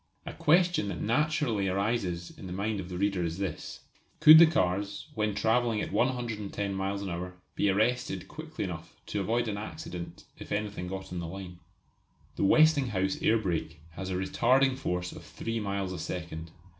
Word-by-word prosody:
A - - -6
question 175 - +3
that 100 - -4
naturally 120 -4 +1
arises 95 -3 -1
in 95 - -9
the - - -7
mind 100 +2 -1
of 90 -1 -6
the 90 - -5
reader 100 -2 +1
is 85 0 -2
this: 95 -1 -5 0.4
could 155 +1 +10
the 170 - +9
cars, 100 - 0
when 105 -1 -1
travelling 115 +1 +2
at - - -3
110 105 -4 -1
miles 95 +1 -2
an 95 - -4
hour, 90 +1 -5 0.2
be 100 - +1
arrested 115 +5 0
quickly 155 0 -6
enough 85 -3 -6
to - - -3
avoid 115 +4 0
an 105 -2 -2
accident 90 -4 -7 0.2
if - - -10
anything 105 -3 -2
got 95 0 -6
on 90 - -3
the 85 - -4
line? 90 0 -8 0.8
The - - -1
Westinghouse 125 -7 +3
air 115 - +4
brake 85 -6 -2
has 95 +3 -6
a 95 - -2
retarding 130 +8 +3
force 90 -8 -2
of - - -10
three 115 0 -4
miles 100 -2 -2
a 90 - -5
second. 85 -1 -5
100 Hz, 180 wpm, -29 LUFS, 90-115 Hz, 0.8 s, could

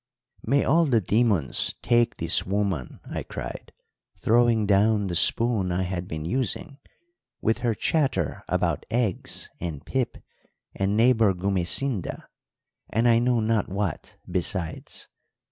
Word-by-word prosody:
"'May 140 +5 +2
all 165 +4 +4
the 120 -5 +3
demons 105 - +1
take 120 -1 +2
this 85 0 +2
woman!' 95 -8 -2
I - - -4
cried, - - -7 0.5
throwing 115 -1 +3
down 105 +1 +3
the 90 - -3
spoon 105 0 +3
I 90 +1 0
had 90 -1 -4
been 80 -2 -5
using, 130 - -3 0.6
'with 110 +2 0
her 120 -3 0
chatter 150 +4 0
about - - 0
eggs 115 -6 -2
and 80 -4 -5
pip 130 -2 -2 0.6
and 100 +2 0
neighbour 115 -4 +4
Gumesinda, 95 +4 -1 0.7
and 115 +2 +1
I 115 -1 +5
know 120 -1 +2
not 110 -2 0
what 100 -3 -4
besides! 85 -2 -3
105 Hz, 130 wpm, -25 LUFS, 90-120 Hz, 0.7 s, I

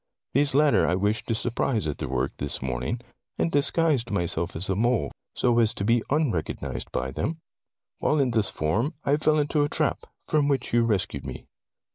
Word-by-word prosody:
These 140 0 +2
latter 150 0 +4
I 90 - +2
wished 105 +3 0
to 115 - +1
surprise 115 - 0
at 75 -2 -3
their 70 - -3
work, 65 +1 0
this 70 - -3
morning, 65 - -3 0.4
and 165 - 0
disguised 145 -4 +2
myself 85 -2 -1
as 85 +4 -2
a 95 - 0
mole 115 - +1 0.2
so 120 -1 +2
as 110 -2 +2
to 100 - -3
be 115 +2 +3
unrecognized 85 - -1
by 65 +1 -2
them. 80 - -2 0.6
While 150 - +2
in 130 -3 +2
this 110 -3 +4
form, 110 - -1
I 140 +1 +3
fell 155 0 +3
into 150 0 +1
a 145 - +1
trap, - - 0 0.3
from 150 -2 +2
which 135 -5 -1
you 120 0 +4
rescued 95 -10 -1
me. - - -7
115 Hz, 190 wpm, -26 LUFS, -, 0.6 s, latter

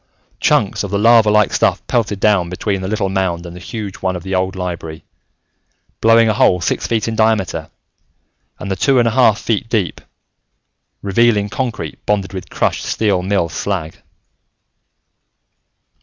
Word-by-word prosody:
Chunks - - +1
of 100 - -4
the 100 - -1
lava 115 0 +5
like 105 -1 +3
stuff - - +1
pelted 105 -4 -1
down 100 -5 +2
between 95 +2 -2
the 95 - -4
little 105 -1 -1
mound 95 -3 -1
and 85 0 -9
the - - -9
huge 105 0 -6
one 95 -1 -2
of 90 - -6
the 95 +1 -5
old 95 +1 0
library, 85 -3 -6 1.0
blowing 115 0 +5
a 110 - +2
hole 100 -5 +3
six 85 - -2
feet 115 -1 -1
in 115 - -2
diameter 110 -4 0 0.9
and 100 - -6
the - - 0
two 135 +8 +2
and 120 -1 +3
a - - +1
half 115 -3 +3
feet 115 0 -2
deep, 105 -7 -1 1.0
revealing 105 +1 +2
concrete 110 - -4
bonded 100 -2 0
with 95 -2 -7
crushed - - -1
steel 100 -4 0
mill 95 -2 0
slag. 85 0 -4
100 Hz, 160 wpm, -17 LUFS, 95-110 Hz, 1.0 s, lava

